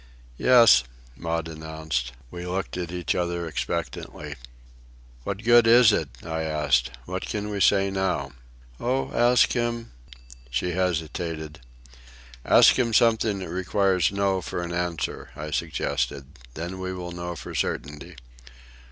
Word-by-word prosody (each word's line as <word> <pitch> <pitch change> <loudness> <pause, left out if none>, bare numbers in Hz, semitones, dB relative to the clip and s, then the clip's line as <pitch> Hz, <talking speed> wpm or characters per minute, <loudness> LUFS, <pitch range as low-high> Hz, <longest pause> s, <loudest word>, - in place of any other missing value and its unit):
"Yes," 115 - +7 0.3
Maud 85 -1 -3
announced. 80 -5 -4 0.2
We 90 0 -7
looked 95 +1 -3
at 90 -2 -4
each 90 -1 -1
other 85 -1 -2
expectantly. 85 +2 -4 0.9
"What 100 +2 -4
good 120 0 +6
is 115 -1 +7
it?" - - 0 0.2
I 80 -1 -3
asked. 75 -6 +1 0.2
"What - - -4
can 105 0 -3
we 100 -1 -3
say 100 0 +4
now?" 95 -8 -1 0.5
"Oh, 130 +2 -1
ask 120 +1 +4
him—" 120 -1 -2 0.6
She 65 +9 -1
hesitated. 80 -3 -2 0.8
"Ask - - +6
him 115 -3 +1
something 110 -3 +3
that 95 -3 -6
requires 95 -1 +1
no 100 -1 0
for 85 +1 -4
an 85 0 -5
answer," 85 -1 -3
I 75 0 -6
suggested. 70 -4 -2 0.3
"Then 85 +4 -5
we 95 0 -4
will 90 -1 -6
know 85 0 -5
for - - -8
certainty." 75 +4 -3
90 Hz, 135 wpm, -25 LUFS, 80-100 Hz, 0.9 s, Yes